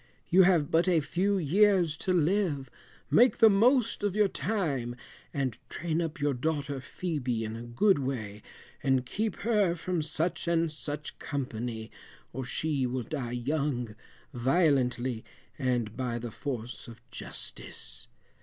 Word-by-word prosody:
You 185 +2 +7
have 175 -6 +4
but 165 +3 +3
a 175 -3 +4
few 190 +6 0
years 185 0 +3
to 190 - -1
live, 170 -6 +1 0.4
make 245 +2 +6
the 225 -2 +7
most 230 +3 +3
of 205 -2 0
your 210 -1 +4
time, 145 - -1 0.4
and 130 -5 -2
train 170 -1 -1
up 165 -2 -3
your 145 0 +1
daughter 145 +1 -2
Phœbe 130 -6 -2
in 110 0 -4
a 115 - -6
good 145 - +3
way, 110 -7 -4 0.4
and 130 -2 +2
keep 210 - -2
her 210 -6 +2
from 175 0 -2
such 160 +3 -1
and 165 -1 +2
such 150 -1 -5
company, 120 -5 -4 0.4
or 130 +2 -3
she 135 +1 -1
will 125 0 -2
die 125 -3 -4
young, 125 -3 -1 0.4
violently, 125 -3 +2 0.4
and 120 -5 0
by 125 -2 -2
the 120 -1 -5
force 120 -2 -5
of 115 -1 -11
justice. - - -6
145 Hz, 145 wpm, -29 LUFS, 125-175 Hz, 0.4 s, You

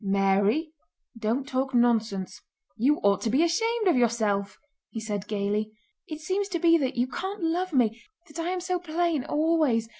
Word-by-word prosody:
"Mary, 200 - +1 0.4
don't 230 +5 -2
talk 265 -1 -2
nonsense. 225 -5 +1 0.3
You 270 +7 +2
ought 200 -1 +3
to 230 - -1
be 270 +8 +3
ashamed 450 +6 +1
of 355 - +4
yourself!" 215 -5 0 0.3
he 225 - -6
said 205 -2 -4
gaily. 210 +1 -2 0.3
"It 310 -1 -6
seems 385 +5 -1
to 370 -3 -2
be 335 0 +5
that 265 -3 -1
you 245 0 +2
can't 380 +9 -5
love 355 +3 0
me, 235 -4 +1 0.3
that 305 +2 -10
I 330 +1 -1
am 365 0 -2
so 365 0 -1
plain... 335 -3 -1
always... 300 -7 +1
260 Hz, 175 wpm, -26 LUFS, 215-335 Hz, 0.4 s, be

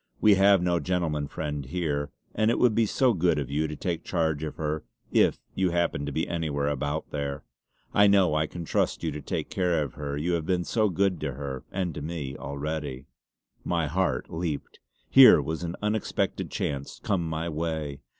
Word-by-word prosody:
We 105 - +6
have 100 -1 +5
no 90 -1 +2
gentleman 80 -6 -1
friend 75 -1 -4
here, 75 -1 -2 0.2
and 110 +1 +2
it 120 - +2
would 125 -3 +4
be 115 0 +3
so 130 +3 +3
good 85 -4 +2
of 70 -2 -3
you 75 +2 +1
to 75 - -5
take 85 +2 -3
charge 80 -4 0
of 75 - -4
her, 75 0 -2 0.3
if - - +4 0.2
you 95 -1 +1
happened 85 -4 0
to - - -2
be 80 +4 -1
anywhere 75 -4 -1
about 75 +2 -2
there. 70 0 -3 0.5
I 105 0 +6
know 100 -5 +4
I 75 0 +1
can 85 0 -7
trust - - 0
you 80 - 0
to 75 0 -6
take - - -4
care 90 -4 +1
of 70 - -6
her, 70 -1 -4
you 80 +4 -1
have 85 -2 0
been 90 -2 +1
so 110 +3 +1
good 95 -1 +1
to 70 -3 -2
her, 65 -1 -6
and 90 -3 -2
to 75 - -6
me, 75 -3 -4
already." 70 -1 -4 0.6
My 85 -2 0
heart 75 -4 -1
leaped. 80 -3 -4 0.3
Here - - +9
was 80 +2 -3
an 85 0 -3
unexpected 105 0 -1
chance 70 -1 -3
come 95 -3 +1
my 80 +1 -2
way. 80 -3 -3
80 Hz, 200 wpm, -27 LUFS, 75-90 Hz, 0.6 s, Here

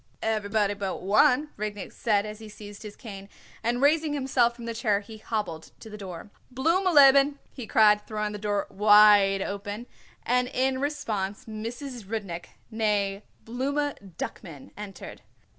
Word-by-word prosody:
"Everybody 210 -2 0
but 200 -2 -4
one," 250 +9 +4
Rudnik 210 -1 -5
said 210 -3 +1
as 210 0 -7
he 220 -1 -10
seized 205 -1 -11
his 210 -1 -9
cane, 200 -5 -10 0.3
and 245 +3 0
raising 305 +1 +3
himself 260 -4 +1
from 235 -1 -9
the 230 - -3
chair 215 -3 +1
he 215 +1 -12
hobbled 200 -8 -4
to 220 - -11
the 210 - -8
door. 190 0 -9 0.2
"Blooma 335 +9 +2
leben," 280 -1 +6 0.2
he 250 -5 -8
cried, 210 -1 +4
throwing 210 -1 -2
the 210 - -6
door 205 -1 -1
wide 205 -1 +6
open; 205 +3 -5 0.4
and 250 +1 +1
in 260 +1 0
response 215 -9 -3
Mrs. 230 +2 -6
Rudnik, 195 -5 -5 0.3
née 205 -3 0 0.2
Blooma 260 - -3
Duckman, 160 -9 -7
entered. 205 -2 -9
215 Hz, 150 wpm, -27 LUFS, 205-250 Hz, 0.4 s, leben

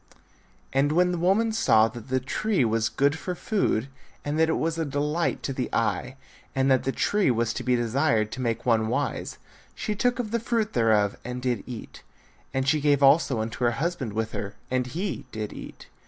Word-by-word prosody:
And 140 +2 +3
when 180 +2 +3
the 175 - -2
woman 200 +6 +2
saw 115 - +4
that 120 0 -10
the 130 0 +2
tree 170 - 0
was 115 0 +1
good 145 +3 +1
for 180 - -4
food 175 - 0 0.4
and 145 +2 -1
that 160 0 +4
it 160 - +1
was 165 0 -1
a - - +1
delight 150 +3 -1
to 135 - -2
the 130 -2 -3
eye, 125 +3 -1 0.4
and 135 0 +2
that 130 - +3
the 135 - +1
tree 205 +4 +1
was 115 -1 +1
to - - -4
be 125 -1 +2
desired 115 -2 +1
to 130 - -5
make 115 -2 -2
one 110 -2 +3
wise, - - -2 0.4
she 210 - -2
took 245 +4 +1
of 235 -4 -3
the 235 - +1
fruit 230 -1 -1
thereof, 110 -4 +2
and 125 +1 -5
did 125 -4 -1
eat; 120 -4 -8 0.5
and 135 0 -1
she 150 +1 +3
gave 145 -1 +3
also 135 -4 +4
unto 115 +3 -4
her 120 0 +3
husband 150 -8 -2
with 110 +1 -2
her 100 +1 -5 0.2
and 130 -1 0
he 175 +1 -4
did 110 -2 -5
eat. - - -10
135 Hz, 205 wpm, -26 LUFS, 115-165 Hz, 0.5 s, saw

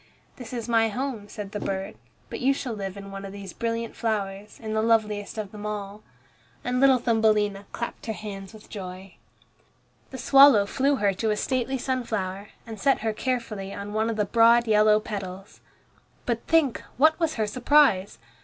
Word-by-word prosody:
"This 245 -3 -9
is 235 -3 -4
my 225 -1 +3
home," 235 -3 -4
said 205 -3 -7
the 210 - -4
bird, 195 -1 -3 0.3
"but - - -6
you 270 +1 +2
shall 255 -4 -4
live 195 -2 -5
in 195 0 -9
one 195 0 -7
of 195 - -7
these 200 -2 -8
brilliant 230 0 -3
flowers, 205 -2 -3
in 220 -1 -5
the 220 - +1
loveliest 215 -2 +1
of 210 -3 -4
them 210 -1 -9
all'." 210 -1 -5 0.6
And 250 0 -1
little 270 -1 +6
Thumbelina 215 -4 +1
clapped 235 0 -6
her 220 - -1
hands 195 -3 -8
with 220 -1 -14
joy. 185 -1 -8 1.0
The 260 - -8
swallow 270 -4 +7
flew 275 +7 +1
with 270 - -2
her 200 -1 +3
to 220 +4 -1
a 210 - +1
stately 260 +3 -1
sunflower, 215 -7 -3 0.2
and 220 -3 -8
set 275 +3 +2
her 220 0 -1
carefully 215 -5 -3
on 200 +1 -6
one 220 +1 +1
of 225 - -2
the 210 -1 +1
broad 235 +3 +5
yellow 215 0 +5
petals. 195 -2 -7 0.6
But 235 -1 -2
think, 320 -6 +2 0.2
what 315 +5 +4
was 325 -2 0
her 220 - 0
surprise! 235 - +3
215 Hz, 185 wpm, -26 LUFS, 200-240 Hz, 1.0 s, swallow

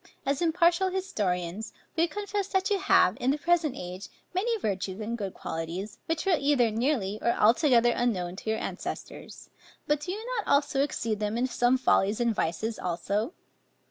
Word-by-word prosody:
As 275 +2 0
impartial 345 +2 +3
historians, 210 - -2 0.2
we 335 +1 +3
confess 410 +1 -3
that 380 +1 0
you 400 - +2
have, - - +4
in 250 - +1
the 285 - +2
present 325 -3 +1
age, 180 +2 -7 0.2
many 450 +6 0
virtues 195 - -3
and 225 +2 -3
good 200 -5 -5
qualities, 170 +6 -5
which 325 +2 -1
were 370 -4 +4
either 275 -5 +3
nearly 220 -4 0
or 235 - +2
altogether 240 +1 +4
unknown 185 -8 -1
to 220 - -5
your 220 - +1
ancestors; - - -7 0.3
but 295 -1 +1
do 325 +5 -4
you 430 +4 -5
not 285 -8 +2
exceed 230 -6 0
them 210 +1 -1
in 245 - +1
some 245 0 +2
follies 210 -4 +2
and 235 -1 +2
vices 215 +5 -2
also? 200 - -2
240 Hz, 170 wpm, -28 LUFS, 210-330 Hz, 0.3 s, have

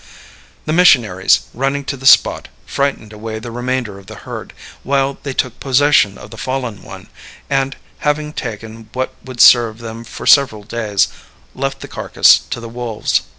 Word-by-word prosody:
The 155 - -1
missionaries, 120 - +4
running 135 +3 -2
to 140 - -3
the 135 0 -2
spot, - - +5 0.2
frightened 140 -6 -2
away 110 +1 -6
the 115 +2 -8
remainder 120 -4 -3
of 95 - -18
the 110 - -9
herd, - - -8 0.3
while 140 0 0
they 140 - -4
took 125 -2 -2
possession 135 -6 +3
of - - -12
the 115 - -10
fallen 125 -6 -4
one, - - -11 0.5
and, 135 0 0 0.2
having 150 0 -1
taken 110 -3 -7
what 130 0 -3
would 130 -2 -10
serve 115 -3 +6
them 115 0 -8
for 115 - -9
several 130 -7 +4
days, 105 -3 0 0.5
left 135 +1 -3
the - - -7
carcass - - +4
to - - -4
the 115 - -8
wolves. 115 -2 -1
120 Hz, 165 wpm, -17 LUFS, 110-135 Hz, 0.5 s, serve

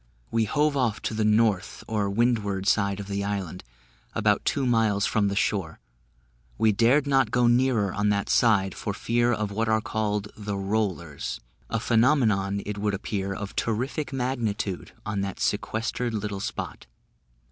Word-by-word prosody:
We 115 -1 +2
hove 150 +5 +1
off 125 -6 +1
to - - -2
the 110 0 0
north 105 -2 +2
or 105 -2 0
windward 100 -3 0
side 100 -1 +2
of 100 - -5
the 100 0 -2
island, 95 -3 -3 0.5
about - - +2
two 140 - +1
miles 110 -4 +2
from 105 -2 +2
the 100 - -1
shore; 95 -6 -1 0.8
we 110 - +4
dared 120 +8 +3
not 135 -4 +3
go 120 +2 +2
nearer 120 -5 +3
on 105 0 +1
that 100 -1 0
side, 100 -5 +3
for 100 - -4
fear 120 +3 +1
of 105 -3 -1
what 110 +2 -1
are 110 0 +3
called 105 -1 -2
the 105 -1 -4
"Rollers" 95 -6 -2 0.3
a 115 - 0
phenomenon, 110 -5 +2
it 105 0 -4
would 105 -1 0
appear, 100 -1 -3
of 100 0 -5
terrific 130 +7 -1
magnitude, 120 -7 -2
on 105 -2 -2
that 100 -1 -4
sequestered 115 +1 -1
little 105 -1 -3
spot. 115 - -5
105 Hz, 160 wpm, -26 LUFS, 100-115 Hz, 0.8 s, we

